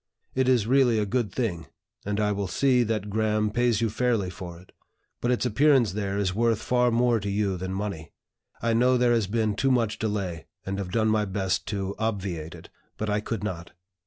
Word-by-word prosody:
It 130 0 +2
is 120 -5 +3
really 125 -1 +4
a 105 - +1
good 115 -1 -1
thing, 95 -8 -2 0.4
and 105 0 -1
I 105 -1 +2
will 100 -1 -2
see 130 +4 +3
that 110 -3 -1
Graham 105 0 +1
pays 120 -1 +1
you 115 - +2
fairly 110 -5 0
for 90 -2 -8
it. 90 - -19 0.5
But 120 - 0
its 125 0 +1
appearance 130 - +4
there 100 0 -2
is 95 -3 0
worth 115 +1 +2
far 125 +1 +2
more 120 0 +2
to 100 0 -4
you 100 -1 0
than 95 +1 -4
money. 95 -5 -4 0.5
I 115 0 +2
know 125 +2 +4
there 120 -1 +3
has 115 -4 +1
been 110 0 0
too 135 +6 +1
much 115 -5 +1
delay, 100 -6 -3 0.2
and 95 +1 -3
have 95 -2 -4
done 110 +1 +2
my 110 -1 +2
best 95 -1 -1
to 100 -2 -2
obviate 95 -8 -3
it. - - -13 0.3
But 110 -1 -2
I 105 - +1
could 105 0 -4
not. 85 -5 -5
105 Hz, 210 wpm, -26 LUFS, 100-120 Hz, 0.5 s, really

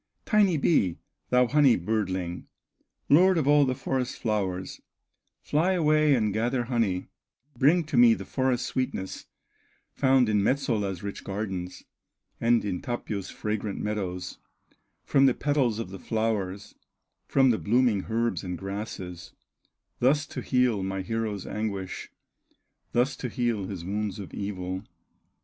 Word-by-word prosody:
"Tiny 205 -7 +3
bee, 100 - +2 0.3
thou 125 0 +4
honey 140 -2 +5
birdling, 95 -3 -2 0.6
Lord 180 +5 +5
of 150 -4 +1
all 145 -1 +6
the 130 -1 0
forest 130 -1 -2
flowers, 95 -5 -2 0.6
Fly 165 +6 +2
away 155 -4 +4
and 110 -4 +1
gather 120 +3 0
honey, 115 -7 -1 0.5
Bring 155 +8 +4
to 150 -4 -3
me 120 -2 +7
the - - -8
forest 130 -2 0
sweetness, 130 -8 -3 0.7
Found 130 -2 +3
in 105 -1 +2
Metsola's 105 -7 0
rich 100 0 -6
gardens, 95 -3 -5 0.6
And 115 -1 +3
in 95 -3 -2
Tapio's 110 -5 -4
fragrant 105 -1 -3
meadows, 95 -4 -4 0.7
From 135 -1 +4
the 130 - +3
petals 135 -6 +1
of 110 -5 -5
the 95 - -8
flowers, 105 -3 -2 0.5
From 135 -2 +4
the 110 - 0
blooming 115 -3 +2
herbs 115 0 0
and 90 -1 -4
grasses, 95 -3 -6 0.7
Thus 145 +5 +3
to - - -6
heal 125 -5 +2
my 95 0 -3
hero's 110 -2 -3
anguish, 100 -3 -4 0.8
Thus 125 +3 +1
to 125 - -4
heal 115 -5 -1
his 95 -5 -6
wounds 105 0 -2
of 100 -3 -8
evil." 95 -1 -4
110 Hz, 135 wpm, -27 LUFS, 95-130 Hz, 0.8 s, me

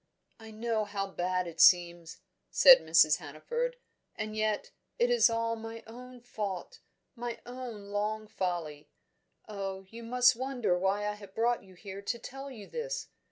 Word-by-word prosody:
"I 220 0 -11
know 220 0 -1
how 200 -1 -3
bad 185 0 -1
it 165 -1 -3
seems," 175 -2 +4 0.3
said 265 -1 +9
Mrs. 160 -1 +5
Hannaford. 470 - -4 0.4
"And 215 0 -4
yet, 215 -1 -1 0.3
it 485 0 +2
is 480 - +5
all 230 0 0
my 225 0 -8
own 250 +2 -11
fault 205 -6 -5 0.4
my 240 -1 -5
own 240 -5 -8
long 215 +1 -1
folly. 165 -7 -4 0.6
Oh, 195 -2 -5
you 230 +1 -9
must 250 +1 +4
wonder 245 -6 0
why 195 +3 0
I 210 - -1
have 200 -2 -13
brought 235 0 +1
you 190 -1 -17
here 195 +1 -8
to 225 +4 -2
tell 270 +4 -8
you 225 -6 -10
this! 485 - -5
215 Hz, 160 wpm, -30 LUFS, 190-240 Hz, 0.6 s, said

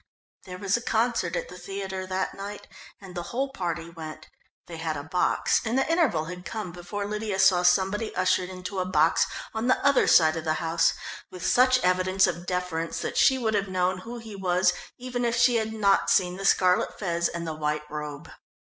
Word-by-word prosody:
There 180 -1 -8
was 195 0 0
a 235 - -1
concert 225 -7 0
at - - -3
the 180 - -11
theatre 190 0 -5
that 185 0 -2
night 200 +1 -7 0.3
and 190 -2 -11
the 175 - -4
whole 270 +3 -2
party 175 -8 -3
went. 160 -2 -9 0.4
They 165 - -8
had 160 -2 -3
a 145 - -5
box, 175 +4 +1
and 230 +3 -1
the 270 - +2
interval 300 - +2
had 180 +2 -8
come 210 -2 -5
before 175 +4 -5
Lydia 210 -1 -3
saw 190 -2 +5
somebody 190 +4 +2
ushered 185 0 +1
into 185 +1 -6
a 180 - 0
box 165 -3 +3 0.3
on 220 +2 -2
the 255 - +4
other 280 -1 +4
side 160 -1 +5
of 160 - -4
the 155 -1 0
house 165 0 +2 0.4
with 180 -1 -8
such 255 +1 +5
evidence 185 +1 +3
of 175 +1 -4
deference 180 -3 -2
that - - -4
she 265 - +5
would 225 -4 -1
have 200 -1 0
known 185 0 0
who 235 +6 -8
he 225 -3 -9
was 180 -1 +2 0.2
even 245 -1 -4
if 235 -1 +1
she 245 0 +4
had 220 -1 -1
not 205 -3 +2
seen 180 -1 +2
the 195 +1 -6
scarlet 185 -2 +3
fez 170 -3 0
and 170 0 -5
the 160 - -3
white 150 0 -2
robe. 150 -1 -6
185 Hz, 205 wpm, -26 LUFS, 175-215 Hz, 0.4 s, saw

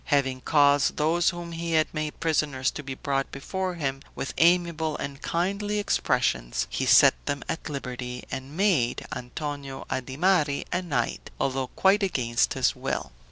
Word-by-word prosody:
Having 135 -3 +1
caused 145 -1 +4
those 160 +3 +3
whom 175 -1 -6
he 165 0 -3
had 155 -1 +4
made 155 -1 -3
prisoners 145 -5 +1
to - - -6
be 135 -2 -6
brought 135 0 -2
before 185 +6 -3
him, 135 -4 -2
with 135 - -4
amiable 170 -2 +3
and 140 +1 -6
kindly 200 +4 -1
expressions 60 - 0
he - - -1
set - - +8
them 140 - -2
at 165 -1 -4
liberty, 125 -3 -5
and 135 +4 -6
made 175 - +2
Antonio 140 +1 -5
Adimari 145 +4 +1
a 180 - 0
knight, 140 -10 -2
although 130 -1 0
quite 195 +8 +3
against 125 -11 +1
his - - +2
will. - - -3
145 Hz, 155 wpm, -26 LUFS, 135-170 Hz, -, set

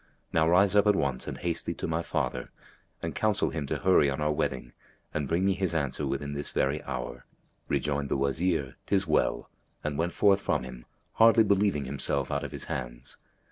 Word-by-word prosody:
Now 80 0 +3
rise 95 +3 +4
up 105 0 +5
at 105 - +5
once 70 -7 -1
and - - -4
haste 85 -1 -2
thee - - -1
to - - -4
my 80 +1 -1
father - - -2 0.5
and - - -3
counsel 110 -2 +1
him 75 -4 -3
to - - -1
hurry 90 -6 +4
on 70 - -2
our 75 0 +1
wedding 70 -3 -2 0.4
and 75 -3 -1
bring 85 +5 +1
me 100 - +3
his 95 -3 -1
answer 70 -4 -1
within 70 +1 -3
this 70 0 -3
very 70 +3 0
hour." 60 0 -5 0.4
Rejoined 70 -1 -1
the - - +1
Wazir, 70 +1 0
"'Tis 100 -1 +2
well!" 80 -3 0 0.3
and 75 -1 -2
went 85 +1 0
forth 100 -1 +4
from - - 0
him, 65 -1 -9 0.3
hardly 115 0 +6
believing 100 -8 +2
himself 70 0 -2
out 70 0 -1
of - - -5
his - - -5
hands. - - -6
75 Hz, 200 wpm, -28 LUFS, 70-95 Hz, 0.5 s, hardly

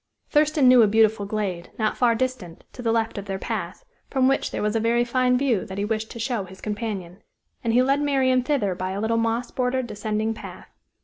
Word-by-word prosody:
Thurston 300 -2 +3
knew 250 -1 +8
a 220 - +6
beautiful 215 -1 +3
glade, 195 -5 -3
not 215 -1 0
far 240 -2 +3
distant, 230 -9 -4
to 250 - -8
the 230 -2 +1
left 225 -2 0
of 200 - -8
their 195 -1 -3
path, - - -5 0.2
from 260 -1 +2
which 270 +1 +1
there - - -3
was 210 +1 0
a - - +3
very 235 +2 +2
fine 250 +1 +2
view 250 -7 +1
that 190 - -7
he 200 - -1
wished 220 0 -2
to - - -9
show 235 -3 -1
his 190 +1 -13
companion. 205 -4 -5 0.4
And 230 - +1
he 245 +2 +4
led 275 +2 +2
Marian 265 -3 +2
thither 250 -8 0
by 185 +1 -4
a 195 - -3
little 225 +2 0
moss 230 +1 -1
bordered, 255 0 -1
descending 215 0 -2
path. - - -10
225 Hz, 225 wpm, -24 LUFS, 210-255 Hz, 0.4 s, knew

